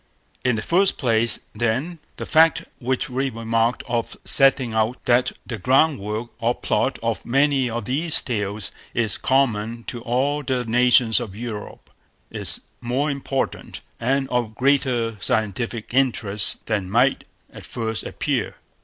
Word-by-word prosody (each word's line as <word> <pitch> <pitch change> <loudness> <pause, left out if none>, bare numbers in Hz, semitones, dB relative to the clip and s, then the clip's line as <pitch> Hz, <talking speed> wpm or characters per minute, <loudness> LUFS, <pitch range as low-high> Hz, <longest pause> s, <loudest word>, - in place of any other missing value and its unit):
In 125 -2 +2
the 110 - -3
first 190 +3 +3
place, 115 -3 +2 0.2
then, 130 +9 -1 0.2
the - - -5
fact 160 +1 +4 0.2
which 130 0 -1
we 135 +1 -1
remarked 115 0 0
on 120 -1 0 0.2
setting 135 -4 +4
out, 110 +3 +1
that 125 0 +3
the 115 -4 -5
groundwork 120 -3 +1
or 115 +1 +1
plot - - 0
of - - -1
many 135 0 +2
of 120 +1 -4
these 150 +6 +2
tales 105 -3 -3 0.2
is 110 -2 0
common 115 -4 +1
to 120 0 -6
all 130 +5 0
the 130 -2 -1
nations 120 0 +4
of 110 -6 -6
Europe, 110 -2 -7 0.4
is - - -2 0.2
more 130 +5 0
important, 135 -1 -3 0.2
and 135 +3 0
of 120 -3 -1
greater 125 -4 +1
scientific 115 0 -2
interest, 110 -6 +1
than 100 -4 -1
might 125 +6 +2 0.3
at - - -10
first 115 -2 -3
appear. - - -2
120 Hz, 140 wpm, -22 LUFS, 110-135 Hz, 0.4 s, fact